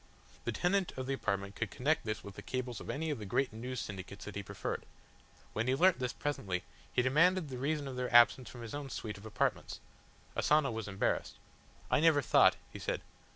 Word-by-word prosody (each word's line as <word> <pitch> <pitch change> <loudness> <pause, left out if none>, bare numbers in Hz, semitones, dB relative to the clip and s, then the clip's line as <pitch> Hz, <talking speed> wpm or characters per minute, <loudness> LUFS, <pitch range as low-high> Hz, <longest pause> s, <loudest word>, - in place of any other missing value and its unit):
The - - 0
tenant 185 +1 +1
of 130 - -3
the 135 - -1
apartment 100 -6 -2
could 110 - -2
connect 145 +7 0
this 110 -1 -3
with 100 - -8
the - - -9
cables 130 -2 -3
of - - -9
any 155 +2 -1
of 140 - -3
the 105 - -6
great 130 +3 +1
News 125 +3 -4
Syndicates 100 0 -6
that 105 - -7
he 100 - -2
preferred. 100 - -4 0.7
When 110 +3 -1
he 130 - +3
learnt 180 +1 +5
this 125 -1 -1
presently, 95 -11 -2 0.3
he 125 - +2
demanded 165 +5 +4
the 130 -2 -5
reason 145 +1 -1
of 130 -2 -5
their 125 0 -2
absence 120 +1 +6
from 120 -2 -9
his 115 - -7
own 145 -1 -4
suite 105 -5 -5
of 105 - -9
apartments. 110 - -1 0.6
Asano 150 -3 +3
was 110 -2 -4
embarrassed. 95 -1 -1 0.6
"I - - +5
never 155 -3 +5
thought," - - +6 0.2
he - - -7
said. - - -2
125 Hz, 210 wpm, -33 LUFS, 110-145 Hz, 0.7 s, absence